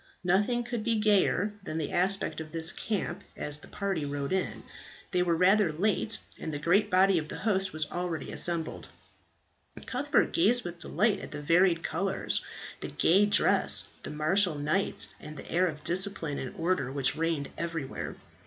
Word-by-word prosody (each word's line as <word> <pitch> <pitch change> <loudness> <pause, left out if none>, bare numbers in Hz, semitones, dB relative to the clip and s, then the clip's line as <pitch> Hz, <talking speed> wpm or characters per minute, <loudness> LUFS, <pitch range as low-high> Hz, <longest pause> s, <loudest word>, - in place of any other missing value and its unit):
Nothing 205 +7 +1
could 240 -2 -4
be 230 0 +1
gayer 210 -1 +2
than 160 -4 -5
the 155 - -3
aspect 190 -1 0
of 155 -1 -9
this 165 +1 +1
camp 200 -3 -4
as 150 0 0
the - - -13
party 200 -6 -3
rode 140 +2 -3
into 190 - -1
it. - - -14 0.5
They 180 - +1
were 175 -1 +1
rather 185 +1 +4
late, 205 +6 +1 0.2
and 160 - -5
the 145 - -3
great 190 +8 +2
body 190 -1 +4
of 155 -1 -7
the - - -5
host 195 -3 0
were 155 - -7
already 175 -4 -4
assembled. 170 -2 -2 1.0
Cuthbert 280 +4 0
gazed 245 -7 +3
with 175 -1 -7
delight 205 +4 0
at - - -8
the 145 - -7
varied 170 +3 +3
colours, 190 +3 0 0.4
the - - -5
gay 195 +5 +3
dresses, 205 - +4
the - - -7
martial 160 +4 +2
knights, 150 +7 +2
and 150 0 -10
the - - -10
air 180 +2 +2
of 150 -3 -6
discipline 175 -4 0
and 130 - -6
order 165 -6 -1
which 135 -1 +1
reigned 160 -3 -2
everywhere. 165 -5 -5
180 Hz, 175 wpm, -29 LUFS, 155-200 Hz, 1.0 s, rather